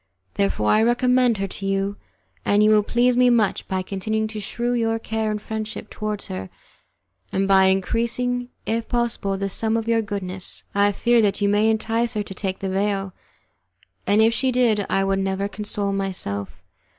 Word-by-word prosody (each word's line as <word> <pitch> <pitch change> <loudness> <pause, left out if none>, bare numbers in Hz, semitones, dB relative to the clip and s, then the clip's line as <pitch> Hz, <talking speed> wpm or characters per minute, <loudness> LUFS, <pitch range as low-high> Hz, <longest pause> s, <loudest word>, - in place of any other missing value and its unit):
Therefore 195 - +1
I 215 - +4
recommend 245 0 +3
her 195 0 -2
to 195 +1 -7
you, 195 +1 0 0.5
and 205 +1 +3
you 215 - +5
will 215 -1 +5
please 240 +4 +2
me 250 0 +5
much 225 -4 +1
by 185 -1 -1
continuing 220 +3 -2
to 215 -1 -6
shew 240 +4 -2
your 225 -1 +1
care 220 -1 -2
and 210 0 -2
friendship 220 0 -6
towards 210 -1 -4
her, 95 0 -6 0.8
and 195 0 0
by 190 -1 +5
increasing, 235 +6 0 0.2
if 225 0 -2
possible, 235 -5 -1
the 195 0 -2
sum 220 +3 0
of 225 0 -3
your 230 -1 +3
goodness. 190 -3 -3
I 200 0 +3
fear 235 +3 +3
that 205 -2 +1
you 205 - +2
may 205 +2 +3
entice 225 +2 0
her 210 - 0
to 195 - -8
take 190 0 -3
the 195 - -4
veil, 195 0 -1 0.9
and 210 +2 +4
if 225 +1 +4
she 260 +3 +1
did 230 -5 +2
I 195 - +2
would 195 0 +1
never 195 +1 -1
console 205 -1 -3
myself. 100 - -4
210 Hz, 185 wpm, -23 LUFS, 195-230 Hz, 0.9 s, you